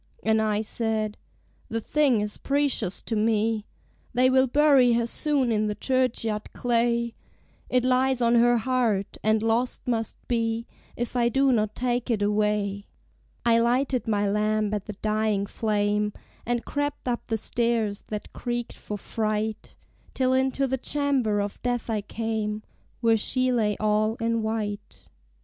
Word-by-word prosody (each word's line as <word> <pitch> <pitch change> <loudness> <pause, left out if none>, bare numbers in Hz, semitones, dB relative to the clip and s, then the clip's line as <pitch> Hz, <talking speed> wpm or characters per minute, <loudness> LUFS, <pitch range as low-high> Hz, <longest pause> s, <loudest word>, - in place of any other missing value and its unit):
And 220 0 +3
I 215 -1 +1
said 220 -1 -1 0.5
"The 225 - -1
thing 265 -2 +2
is 210 0 -4
precious 275 -9 0
to 225 - -2
me: 220 0 +1 0.5
They 255 +1 +4
will 260 0 +4
bury 275 -2 +5
her 235 0 +2
soon 275 0 0
in 215 -1 +1
the 210 - -2
churchyard 230 -3 -1
clay; 235 -1 +1 0.6
It 250 -1 +2
lies 255 0 +2
on 235 -1 +3
her 240 0 +5
heart, 225 -4 0
and 215 0 +2
lost 230 +3 0
must 225 -3 -1
be 230 -1 0 0.3
If 240 +1 -4
I 235 -1 +3
do 270 +3 +3
not 215 -2 0
take 245 0 -1
it 215 -4 +1
away." 205 -1 0 0.6
I 230 -1 +5
lighted 250 +2 +1
my 205 -2 +1
lamp 215 +1 +1
at 205 -2 -2
the 210 - -6
dying 215 -2 +1
flame, 210 -1 0 0.3
And 240 -1 -1
crept 290 -1 -3
up 240 -1 -2
the 225 - 0
stairs 225 -2 0
that 210 -1 -6
creaked 240 -1 -3
for 210 - -6
fright, 215 0 -3 0.4
Till 260 -1 +2
into 265 +1 +1
the 265 0 -1
chamber 265 -7 0
of 205 0 -4
death 245 -2 -1
I 215 -2 0
came, 215 0 -3 0.4
Where 225 -1 +4
she 255 +4 +1
lay 215 -4 +1
all 215 +1 +1
in 230 -1 0
white. 215 -2 -4
225 Hz, 155 wpm, -26 LUFS, 215-245 Hz, 0.6 s, bury